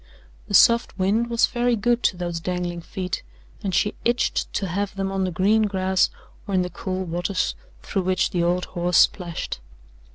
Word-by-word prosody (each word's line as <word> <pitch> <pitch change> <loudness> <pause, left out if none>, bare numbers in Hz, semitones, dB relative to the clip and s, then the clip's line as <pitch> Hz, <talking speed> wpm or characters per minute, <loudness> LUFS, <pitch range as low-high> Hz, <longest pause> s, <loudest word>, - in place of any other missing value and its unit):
The 205 - 0
soft 235 0 +5
wind 210 +5 +1
was 235 -1 +4
very 240 0 +1
good 240 +3 +1
to 185 - +2
those 175 -1 -3
dangling 175 0 -3
feet, 185 +1 -4 0.4
and 195 - -1
she 205 +3 +1
itched 240 +1 0
to 200 - 0
have 200 +3 -2
them 195 0 -2
on 195 -1 0
the - - -1
green 210 +5 +3
grass 190 -1 +2 0.4
or 200 - -1
in 185 - +3
the 180 - -5
cool 185 +2 -3
waters 175 +3 -1 0.3
through 195 - -1
which 185 0 +1
the 175 -3 0
old 175 +1 +1
horse 175 -1 0
splashed. 175 - +1
190 Hz, 185 wpm, -23 LUFS, 180-205 Hz, 0.4 s, soft